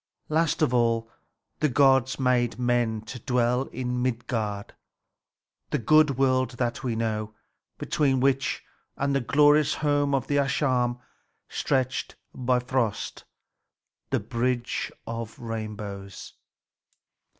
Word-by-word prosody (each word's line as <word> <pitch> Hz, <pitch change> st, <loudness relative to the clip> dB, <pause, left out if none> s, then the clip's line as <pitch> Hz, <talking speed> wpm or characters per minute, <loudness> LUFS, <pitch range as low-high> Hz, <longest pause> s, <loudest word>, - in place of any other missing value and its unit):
Last 160 Hz, 0 st, +1 dB
of 125 Hz, -, +2 dB
all, 115 Hz, -2 st, +1 dB, 0.5 s
the 150 Hz, -, +2 dB
gods 135 Hz, -1 st, +3 dB
made 125 Hz, -3 st, +2 dB
men 120 Hz, -3 st, +1 dB
to 115 Hz, +3 st, -8 dB
dwell 125 Hz, +2 st, +1 dB
in 125 Hz, 0 st, -3 dB
Midgard, 115 Hz, -4 st, -2 dB, 1.0 s
the -, -, 0 dB
good 150 Hz, +3 st, +4 dB
world 130 Hz, -1 st, +2 dB
that 120 Hz, -2 st, -2 dB
we 120 Hz, -3 st, -1 dB
know, 110 Hz, -1 st, -2 dB, 0.4 s
between 135 Hz, -3 st, +1 dB
which 135 Hz, 0 st, +1 dB, 0.3 s
and 140 Hz, 0 st, 0 dB
the 135 Hz, -, +2 dB
glorious 145 Hz, +3 st, +4 dB
home 145 Hz, -1 st, +1 dB
of 135 Hz, -, -1 dB
the 145 Hz, -, 0 dB
Æsir 130 Hz, -3 st, +1 dB, 0.5 s
stretched 130 Hz, -2 st, -1 dB, 0.2 s
Bifröst, 125 Hz, -2 st, -1 dB, 0.8 s
the -, -, +1 dB
bridge 120 Hz, 0 st, -2 dB
of 115 Hz, -1 st, -6 dB
rainbows. 105 Hz, -4 st, -6 dB
125 Hz, 110 wpm, -26 LUFS, 115-135 Hz, 1.0 s, good